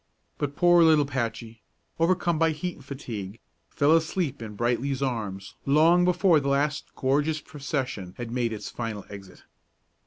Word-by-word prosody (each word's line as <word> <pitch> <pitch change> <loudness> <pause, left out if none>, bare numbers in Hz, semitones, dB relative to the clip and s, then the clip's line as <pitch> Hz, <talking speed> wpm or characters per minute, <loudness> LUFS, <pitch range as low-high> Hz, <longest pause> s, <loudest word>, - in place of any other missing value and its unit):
But 145 -1 -2
poor 175 -1 +5
little 155 -3 +5
Patchy, 115 -4 -4 0.4
overcome 170 -1 +2
by 165 -1 +3
heat 175 +3 -5
and - - -15
fatigue, 115 -7 -7 0.3
fell 150 +2 +3
asleep 160 -4 -1
in 110 -2 -7
Brightly's 125 +4 -1
arms 100 -7 -4
long 165 +5 +4
before 180 -2 +4
the 140 - -4
last 140 +1 -1
gorgeous 145 +4 +1
procession 135 - -4
had 120 -2 -6
made 120 -1 0
its 110 - -6
final 115 -4 -5
exit. 100 -2 -11
140 Hz, 150 wpm, -26 LUFS, 115-160 Hz, 0.4 s, poor